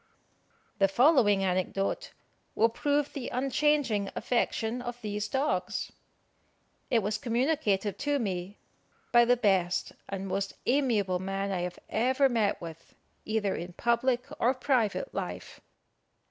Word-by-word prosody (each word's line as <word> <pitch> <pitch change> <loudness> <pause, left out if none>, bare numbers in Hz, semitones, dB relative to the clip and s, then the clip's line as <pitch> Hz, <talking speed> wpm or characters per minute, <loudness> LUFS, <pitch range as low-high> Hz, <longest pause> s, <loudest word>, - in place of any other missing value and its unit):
The 195 - +5
following 210 - +4
anecdote 185 +1 -1 0.4
will 225 +1 +4
prove 290 +4 0
the 270 -4 -4
unchanging 260 -5 +1
affection 240 -1 -1
of 245 0 -6
these 210 0 -2
dogs. 195 -10 -1 1.0
It 230 -4 +2
was 210 +2 -1
communicated 230 -5 0
to 290 0 +1
me 195 -4 -3 0.5
by 240 0 +6
the 245 +1 +4
best 185 -5 +1 0.2
and 195 0 -4
most 195 +1 -2
amiable 225 -9 +2
man 195 +1 -2
I 185 - -1
have 180 0 -4
ever 260 +4 +2
met 220 -4 +1
with, 165 -1 -10 0.3
either 215 -2 0
in 175 +1 -6
public 240 +3 +1 0.2
or 250 +3 +3
private 255 - 0
life. - - -6
220 Hz, 125 wpm, -29 LUFS, 195-255 Hz, 1.0 s, by